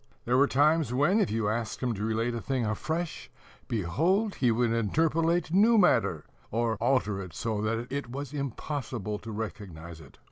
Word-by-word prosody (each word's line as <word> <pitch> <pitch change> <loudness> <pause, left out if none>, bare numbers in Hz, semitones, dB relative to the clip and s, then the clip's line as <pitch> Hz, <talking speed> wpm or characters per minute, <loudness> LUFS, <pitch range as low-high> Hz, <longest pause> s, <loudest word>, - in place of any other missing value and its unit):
There 120 - +2
were 140 +2 +5
times 150 +2 +3
when, 145 - +3
if 200 - +2
you 110 -1 -1
asked 110 +1 -2
him 125 -2 +1
to 105 -1 -5
relate 115 +2 0
a 115 - -4
thing 130 -2 -1
afresh, 155 +10 -3 0.4
behold, 165 - +1
he 125 - +1
would 115 0 +2
interpolate 160 - +1
new 220 +5 +5
matter, 190 - +3 0.2
or 115 0 0
alter 105 -6 +1
it 90 -4 -9
so 110 -2 -2
that 115 +2 -1
it 140 -2 -3
was 140 +3 -6
impossible 130 -6 -4
to 115 - -8
recognize 90 -7 -7
it. 70 - -16
120 Hz, 175 wpm, -28 LUFS, 110-150 Hz, 0.4 s, were